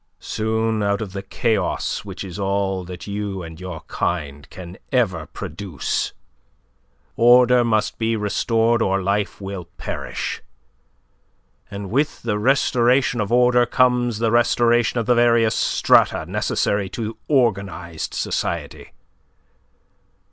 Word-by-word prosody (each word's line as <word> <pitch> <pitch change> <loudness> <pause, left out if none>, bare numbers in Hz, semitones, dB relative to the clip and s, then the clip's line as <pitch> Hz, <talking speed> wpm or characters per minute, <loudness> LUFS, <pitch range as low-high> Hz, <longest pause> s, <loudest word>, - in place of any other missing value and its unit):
Soon 110 0 -1
out 100 0 +1
of 105 -4 -6
the 100 - -4
chaos 115 +2 -1
which - - -7
is 95 -1 -8
all 95 -1 -1
that 90 -1 -8
you 100 -2 -4
and 80 0 -10
your 90 -3 -6
kind 75 -5 -4
can 90 0 -10
ever 120 -8 0
produce, 95 -8 -4 1.0
order 125 +1 +6
must 110 -2 0
be 115 0 +1
restored 115 +2 +1
or 95 -2 +1
life 100 +2 -1
will 95 -3 -6
perish; - - -4 1.3
and 100 -1 -7
with 145 +5 0
the 105 -3 -1
restoration 125 0 +2
of 105 - -3
order 125 0 +4
comes 125 -2 +2
the 115 0 0
restoration 120 0 +3
of 115 - -2
the 125 - +4
various 120 -2 +3
strata - - +3
necessary 100 -2 -1
to 115 +1 -5
organized 100 - -1
society. - - -3
110 Hz, 120 wpm, -21 LUFS, 95-120 Hz, 1.3 s, order